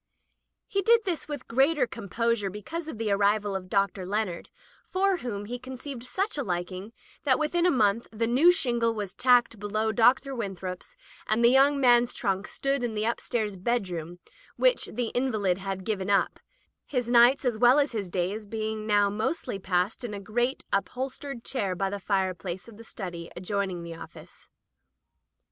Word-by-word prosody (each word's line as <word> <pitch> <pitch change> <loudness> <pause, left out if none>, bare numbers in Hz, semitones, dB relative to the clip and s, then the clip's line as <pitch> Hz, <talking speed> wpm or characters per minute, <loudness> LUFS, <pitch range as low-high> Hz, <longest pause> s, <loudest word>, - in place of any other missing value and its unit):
He 395 - 0
did 460 +4 +5
this 350 -4 -2
with 290 -4 -6
greater 270 +3 +3
composure 230 -1 -1
be 210 +2 -8
cause 335 - -5
of 315 - -6
the 220 -2 -1
arrival 205 0 +2
of 185 -1 -5
Dr. 195 -1 +1
Leonard, 195 -2 -2 0.4
for 385 0 +2
whom 205 -9 -5
he 245 +3 -5
conceived 260 0 -7
such 390 +4 -2
liking 185 -2 -3 0.3
that 265 -3 +3
within 340 +3 +1
a - - +5
month 230 - +2
the 225 +1 -1
new 265 +10 +6
shingle 235 -9 +1
was 205 -4 -4
tacked 245 -3 +3
below 215 +2 -1
Dr. 250 +4 +3
Winthrop's, 190 -6 -5 0.3
and 230 +2 +3
the 235 - +7
young 275 +2 +5
man's 245 -2 +4
trunk 195 +1 -1
stood 275 -1 -1
in 230 -2 -2
the 210 +1 -1
upstairs 225 -2 -1
bedroom 180 -6 -2 0.4
which - - +3
the 235 0 -3
in 255 +1 0
valid 195 -4 0
had 195 -1 -4
given 200 -3 -2
up, 200 -1 +2 0.5
his 250 -4 -1
nights 245 +3 +5
as 235 -3 0
well 245 +3 +6
as 290 -1 +2
his 205 -6 -3
days 195 +4 -2
being 220 0 -3
now 205 -1 +4
mostly 215 +2 -2
passed 185 +5 -1
in 220 -4 -4
a - - -5
great 240 +6 -1
up 200 - +1
holstered 260 -1 -5
chair 200 -9 -2
by 195 +1 -1
the 200 - -4
fireplace 185 -2 -2
of 225 -3 -13
the 230 - -11
study 175 -6 -7
adjoining 190 -1 -2
the 170 0 -7
office. 165 - -12
220 Hz, 175 wpm, -27 LUFS, 195-255 Hz, 0.5 s, the